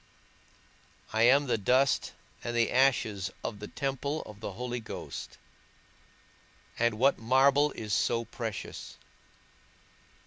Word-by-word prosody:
I 110 - +2
am 140 +2 +5
the 120 -4 0
dust 130 +6 +2 0.3
and 120 - -3
the 115 -1 +2
ashes 115 -7 +2
of 105 - -4
the 105 - -7
temple 140 +2 -3
of 105 -1 -11
the 105 -2 -5
Holy 120 +3 -4
Ghost, 110 - -7 1.4
and 120 -1 +2
what 135 +4 +3
marble 135 +5 +4
is 105 -2 -4
so 115 +2 +1
precious? 110 -2 -6
120 Hz, 115 wpm, -30 LUFS, 110-135 Hz, 1.4 s, am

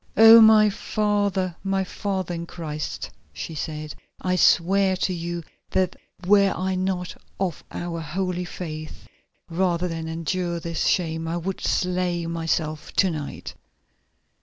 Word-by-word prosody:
"Oh! 225 +1 +10
my 220 -1 +7
father, 205 -4 0
my 195 0 0
father 190 -1 -3
in 170 0 -5
Christ," 155 -4 -5 0.2
she 80 - -6
said, 155 0 -5 0.3
"I 185 0 0
swear 190 +2 +4
to 185 - 0
you 170 0 -4 0.3
that 185 -1 +1 0.3
were 200 +1 +5
I 190 +1 -1
not 185 -1 -2 0.2
of 185 -4 -2
our 170 -1 -4
holy 180 +3 -2
faith, 155 -3 -7 0.4
rather 175 0 0
than 165 -1 -4
endure 170 +2 -2
this 165 0 -2
shame 165 -2 0
I 165 +1 -1
would 185 +2 -4
slay 180 -2 0
myself 165 -2 -2
to 190 -2 +3
night! 150 -3 -6
180 Hz, 135 wpm, -24 LUFS, 165-190 Hz, 0.4 s, Oh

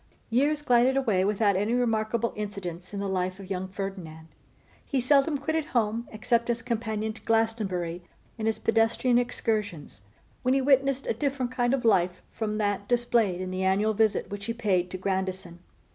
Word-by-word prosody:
_ - - -35 0.3
YEARS 290 +5 +2
glided 250 0 +4
away 215 -9 +2
without 205 0 +2
any 205 +5 0
remarkable 230 -1 0
incidents 190 -4 -6
in 200 - -4
the 200 - -2
life 185 0 -2
of 195 0 -10
young 190 0 -2
Ferdinand. 185 -5 -7 0.5
He 275 - -1
seldom 280 +4 +3
quitted 315 +2 -1
home, 230 -2 -1
except 230 +2 0
as 235 -1 -1
companion 220 -2 -2
to 225 - -14
Glastonbury 205 -7 0 0.3
in 220 -1 -3
his 220 - +1
pedestrian 235 +2 +2
excursions, 210 - -2 0.4
when 255 +1 +2
he - - +3
witnessed 275 0 +2
a - - 0
different 260 +1 -2
kind 245 -1 +1
of 250 - -5
life 180 -4 +2
from 215 -1 -3
that 205 -1 -1
displayed 235 -6 +1
in 185 0 -4
the 185 0 -3
annual 200 +3 +2
visit 215 -1 +1
which 200 0 -5
he 230 - -2
paid 190 -6 +1
to 185 - -5
Grandison. 185 -2 -3
215 Hz, 175 wpm, -27 LUFS, 190-240 Hz, 0.5 s, glided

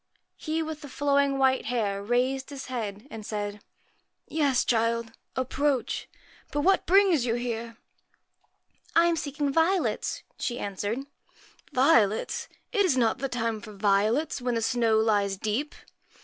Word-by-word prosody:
He 320 0 -2
with 310 -1 -6
the 290 - -9
flowing 280 0 +2
white 265 -1 +3
hair 210 -5 -1
raised 255 +5 0
his 280 -2 -7
head, 215 -1 -4
and 220 -1 -7
said 205 -1 -4 0.7
'Yes, 285 -5 +1
child, 230 0 +1 0.2
approach. 260 0 -1 0.4
But 290 - 0
what 380 +5 +3
brings 375 -7 +5
you 230 - +1
here? 235 -1 -4 0.4
' - - -45
' - - -52 0.3
I 335 - +6
am 340 -1 +3
seeking 285 -2 -2
violets,' 335 +4 +1 0.2
she 240 - -2
answered. 205 +2 -3
1 275 +1 -7 0.7
Violets! 235 -7 +3 0.2
It 410 -4 +3
is 325 -9 +2
not 235 0 +2
the 275 +1 -2
time 230 -3 -2
for 215 -1 -10
violets, 210 +9 +1
when 245 -1 0
the 230 - 0
snow 230 -1 +2
lies 205 -3 +2
deep 220 +9 -2
245 Hz, 150 wpm, -27 LUFS, 220-285 Hz, 0.7 s, I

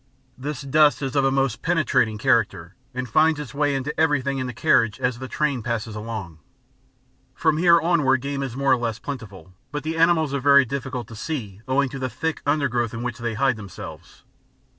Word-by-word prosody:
This 140 +2 -5
dust 145 -1 +3
is 135 +1 -3
of 140 - +3
a - - +4
most 135 -5 0
penetrating 130 -10 +1
character, 105 -8 +1 0.2
and 130 -1 -4
finds 155 +6 +3
its 145 -6 -7
way 145 0 +1
into 135 +3 -2
everything 140 -3 +1
in 130 - -2
the - - -4
carriage 115 -1 +2
as 125 -1 -1
the 130 - -6
train 140 -3 -1
passes 115 -1 -3
along. 105 -7 -6 1.0
From 160 -2 +2
here 170 -1 +6
onward 150 -6 +2
game 140 +1 -3
is 130 -3 -4
more 140 -1 +2
or - - +5
less 115 -2 -2
plentiful, 100 - -8 0.2
but 145 +1 -4
the 160 +1 -3
animals 165 -3 +3
are 140 - 0
very 140 0 +6
difficult 130 -2 -4
to 115 - -9
see 110 - -5
owing 140 +2 +2
to 135 - -7
the 130 0 -2
thick 160 +4 -3
undergrowth 125 -6 0
in 115 - -5
which 125 -1 -4
they 120 -2 -3
hide 135 -1 +2
themselves. 100 -4 -10
135 Hz, 200 wpm, -23 LUFS, 115-145 Hz, 1.0 s, here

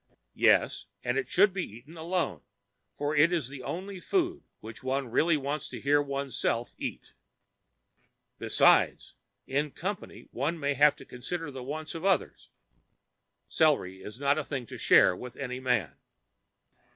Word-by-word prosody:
Yes, - - +3 0.2
and 125 0 0
it 135 - -1
should 200 +1 +4
be 190 -2 -2
eaten 125 +9 -11
alone, 170 +2 -2 0.6
for 145 +1 -1
it 155 +4 +5
is 160 -8 0
the 135 -1 -8
only 185 +9 -5
food 355 - 0 0.2
which 110 +1 -10
one 130 -1 -2
really 160 +5 +3
wants 140 +1 -3
to - - -7
hear 145 +1 +3
oneself 140 -4 -2
eat. - - -6 1.3
Besides, - - +3 0.3
in 145 +3 0
company 190 +7 -6
one 150 +7 -2
may 140 -1 0
have 145 +2 +5
to - - -13
consider 155 +5 -5
the 130 -1 -7
wants 155 +5 -5
of 165 0 -6
others. 195 -1 0 1.0
Celery 115 - +2
is 105 +5 -8
not 140 +2 +2
a - - -2
thing 135 -3 -4
to - - -9
share 95 - +6
with 125 +5 -9
any 125 -2 -4
man. 110 - 0
140 Hz, 150 wpm, -29 LUFS, 125-165 Hz, 1.3 s, share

